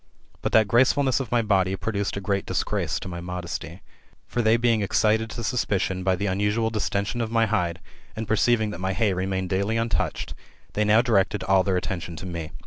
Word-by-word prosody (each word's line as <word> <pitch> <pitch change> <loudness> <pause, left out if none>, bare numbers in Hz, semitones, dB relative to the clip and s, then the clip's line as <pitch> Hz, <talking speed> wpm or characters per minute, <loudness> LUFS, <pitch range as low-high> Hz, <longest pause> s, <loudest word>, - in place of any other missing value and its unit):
But - - -1
that 110 -2 +5
graceful 130 +5 +4
ness 130 -1 +2
of 135 - -5
my 120 -1 +2
body 95 -3 +2
produced 100 +1 -2
a - - -3
great 100 0 -1
disgrace - - -1
to - - -6
my 85 -1 -6
modesty. 90 0 -6 0.4
For 120 - -2
they 110 0 +4
being 115 -2 +2
excited 110 +2 +2
[to 115 - -6
suspicion] 100 -6 -1
by 95 0 +2
the 100 - -3
unusual 105 +4 0
distention 105 +1 -1
of 115 - -2
my 115 0 +3
hide, 90 -6 -1 0.4
and 110 0 -4
perceiving 110 0 +2
that 90 - -7
my 95 0 -1
hay 105 -1 +1
remained 95 0 -2
daily 100 +4 0
untouched, 115 0 -1 0.4
they 105 - +1
now 110 +3 +5
directed 105 -4 +1
all 95 0 +4
their 95 -1 0
attention 85 -2 -4
to 85 - -8
me. 85 -3 -5
100 Hz, 205 wpm, -25 LUFS, 95-115 Hz, 0.4 s, that